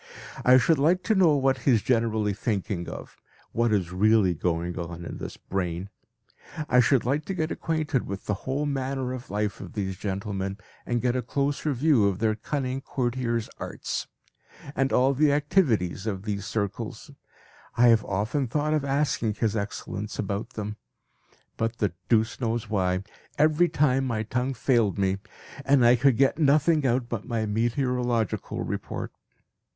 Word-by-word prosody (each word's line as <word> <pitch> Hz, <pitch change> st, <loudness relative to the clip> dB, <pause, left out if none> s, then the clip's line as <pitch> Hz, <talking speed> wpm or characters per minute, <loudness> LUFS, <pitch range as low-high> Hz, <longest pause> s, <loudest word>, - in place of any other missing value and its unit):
I 125 Hz, +1 st, +7 dB
should 155 Hz, +3 st, +3 dB
like 175 Hz, +6 st, +3 dB
to 220 Hz, -, +2 dB
know 180 Hz, -7 st, +5 dB
what 135 Hz, -1 st, +2 dB
he 130 Hz, -, +2 dB
is 110 Hz, -5 st, +2 dB
generally 110 Hz, -3 st, +1 dB
thinking 95 Hz, -4 st, -2 dB
of, -, -, -9 dB, 0.3 s
what 115 Hz, 0 st, +1 dB
is 95 Hz, -5 st, 0 dB
really 100 Hz, 0 st, +4 dB
going 85 Hz, +2 st, -2 dB
on 85 Hz, 0 st, -6 dB
in -, -, -7 dB
this -, -, -7 dB
brain; 90 Hz, 0 st, -3 dB, 0.8 s
I 125 Hz, -, +4 dB
should 125 Hz, 0 st, +3 dB
like 140 Hz, +5 st, 0 dB
to 195 Hz, -, -3 dB
get 160 Hz, -2 st, -1 dB
acquainted 155 Hz, -5 st, -1 dB
with 100 Hz, 0 st, -6 dB
the 105 Hz, -, 0 dB, 0.2 s
whole 140 Hz, +3 st, 0 dB
manner 135 Hz, -2 st, -2 dB
of 130 Hz, -1 st, -8 dB
life 105 Hz, 0 st, -2 dB
of -, -, -9 dB
these 95 Hz, -4 st, -3 dB
gentlemen, 100 Hz, 0 st, -3 dB, 0.3 s
and 120 Hz, 0 st, 0 dB
get 125 Hz, 0 st, +1 dB
a 125 Hz, -, +1 dB
closer 140 Hz, +5 st, -1 dB
view 130 Hz, -5 st, +3 dB
of 95 Hz, -2 st, 0 dB
their 110 Hz, +1 st, +1 dB
cunning 130 Hz, +3 st, -3 dB
courtiers' 120 Hz, -3 st, -1 dB
arts, -, -, -4 dB, 0.7 s
and 135 Hz, 0 st, +1 dB
all 130 Hz, +2 st, +4 dB
the 145 Hz, +2 st, +3 dB
activities 135 Hz, -, +1 dB
of 95 Hz, -3 st, -3 dB
these 105 Hz, -1 st, -3 dB
circles. 100 Hz, -3 st, -4 dB, 0.7 s
I 120 Hz, 0 st, +6 dB
have 115 Hz, -2 st, +5 dB
often 110 Hz, +8 st, -1 dB
thought 150 Hz, +5 st, 0 dB
of 155 Hz, -2 st, +1 dB
asking 135 Hz, -6 st, 0 dB
His 110 Hz, 0 st, 0 dB
Excellence 100 Hz, 0 st, -4 dB
about 100 Hz, 0 st, -3 dB
them; 105 Hz, 0 st, -5 dB, 0.8 s
but 115 Hz, +1 st, -1 dB
the 105 Hz, -6 st, 0 dB, 0.2 s
deuce 110 Hz, +2 st, +2 dB
knows 115 Hz, -2 st, -2 dB
why! 95 Hz, -2 st, +1 dB, 0.3 s
every 155 Hz, +3 st, +4 dB
time 135 Hz, -2 st, +2 dB
my 115 Hz, -3 st, -1 dB
tongue 125 Hz, +4 st, -2 dB
failed 115 Hz, -5 st, +2 dB
me 95 Hz, 0 st, +1 dB, 0.4 s
and 135 Hz, -3 st, +4 dB
I 120 Hz, +1 st, +7 dB
could 125 Hz, 0 st, +3 dB
get 135 Hz, +3 st, +3 dB
nothing 150 Hz, 0 st, +4 dB
out 120 Hz, 0 st, +1 dB
but 115 Hz, -4 st, -4 dB
my 115 Hz, -3 st, -1 dB
meteorological 120 Hz, +1 st, -1 dB
report. -, -, -4 dB
120 Hz, 165 wpm, -26 LUFS, 105-135 Hz, 0.8 s, I